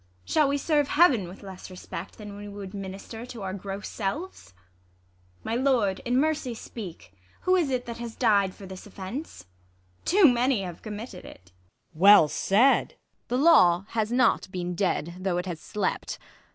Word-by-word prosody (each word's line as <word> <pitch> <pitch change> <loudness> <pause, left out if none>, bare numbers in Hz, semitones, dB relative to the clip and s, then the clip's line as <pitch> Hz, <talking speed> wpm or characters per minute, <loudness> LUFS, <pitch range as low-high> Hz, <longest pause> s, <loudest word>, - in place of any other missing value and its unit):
Shall 305 -2 +3
we 280 +1 +1
serve 290 0 +1
Heaven 280 - +4
^Vith 185 +4 -12
less 190 -1 -9
respect, 185 -1 -8
than 210 -2 -9
we 205 0 -8
would 200 -1 -8
minister 195 +3 -7
To 235 -5 -8
our 190 -1 -3
gross 195 +1 -6
selves? 215 - -5 0.9
My 225 - -3
lord, 240 -6 +2
in 245 +1 +1
mercy 295 -4 0
speak! 175 - -9 0.3
Who 370 - +3
is 340 -6 +2
it 255 -2 -1
that 235 0 -7
has 235 -1 -6
died 200 -3 +2
for 200 - -11
this 190 +2 -10
oflfence 205 - -7
I - - -31 0.6
Too 380 +1 +5
manv 245 -5 +3
have 175 -2 -8
committed 210 -2 -7
it. 90 0 -14 0.4
Luc. 160 - -12
Well 200 -5 +8
said! 225 - +3
Ang, - - -32 0.3
The 250 - 0
law 195 - +5
has 220 -1 -1
not 245 -6 +2
been 180 -1 -3
dead, 175 -2 -1
though 185 -2 -1
it 180 - -2
has 175 -4 -5
slept. 195 +4 -3
205 Hz, 180 wpm, -26 LUFS, 190-250 Hz, 0.9 s, Well